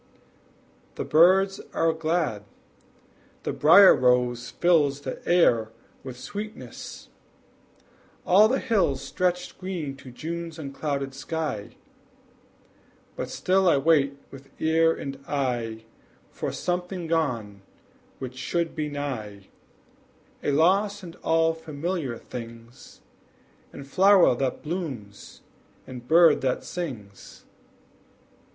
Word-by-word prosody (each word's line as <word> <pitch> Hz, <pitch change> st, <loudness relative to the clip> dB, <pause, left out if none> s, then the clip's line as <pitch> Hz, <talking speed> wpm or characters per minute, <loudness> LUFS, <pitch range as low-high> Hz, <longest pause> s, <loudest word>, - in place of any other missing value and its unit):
The -, -, -4 dB
birds 190 Hz, +5 st, +4 dB
are 165 Hz, 0 st, +2 dB
glad; 160 Hz, -9 st, -1 dB, 1.0 s
the -, -, -2 dB
brier 190 Hz, +6 st, +8 dB
rose 125 Hz, -1 st, +1 dB
fills 150 Hz, -5 st, +2 dB
The 130 Hz, -, -6 dB
air 120 Hz, -11 st, +4 dB, 0.3 s
with 130 Hz, -2 st, -8 dB
sweetness; 210 Hz, -, -8 dB, 1.2 s
all 200 Hz, +4 st, +6 dB
the 260 Hz, +4 st, +1 dB
hills 195 Hz, -, +1 dB
Stretch 180 Hz, +5 st, -2 dB
green 175 Hz, -7 st, -4 dB
to 135 Hz, -, -12 dB
June's 165 Hz, +5 st, -6 dB
unclouded 140 Hz, -2 st, -4 dB
sky; 150 Hz, -6 st, -4 dB, 1.4 s
But -, -, -5 dB
still 190 Hz, 0 st, +2 dB
I 155 Hz, -, +4 dB
wait 140 Hz, -1 st, +2 dB
with 135 Hz, 0 st, -13 dB
ear 165 Hz, +1 st, +3 dB
and 140 Hz, -3 st, -6 dB
eye 120 Hz, -5 st, -2 dB, 0.5 s
For -, -, -4 dB
something 180 Hz, 0 st, -3 dB
gone 120 Hz, -12 st, -2 dB, 0.6 s
which 130 Hz, -1 st, -7 dB
should 170 Hz, +4 st, -2 dB
be 155 Hz, -2 st, -2 dB
nigh, 110 Hz, -9 st, -6 dB, 0.9 s
A -, -, -1 dB
loss 195 Hz, +7 st, +2 dB
in 170 Hz, -2 st, -9 dB
all 165 Hz, 0 st, +2 dB
familiar 160 Hz, -4 st, -4 dB
things, 115 Hz, +1 st, -11 dB, 0.7 s
In 140 Hz, -, -9 dB
flower 185 Hz, +4 st, +5 dB
that 130 Hz, +1 st, -3 dB
blooms, 140 Hz, -, -6 dB, 0.4 s
and 125 Hz, -1 st, -10 dB
bird 165 Hz, 0 st, +5 dB
that 130 Hz, -2 st, -1 dB
sings. 115 Hz, -, -8 dB
150 Hz, 105 wpm, -25 LUFS, 130-175 Hz, 1.4 s, brier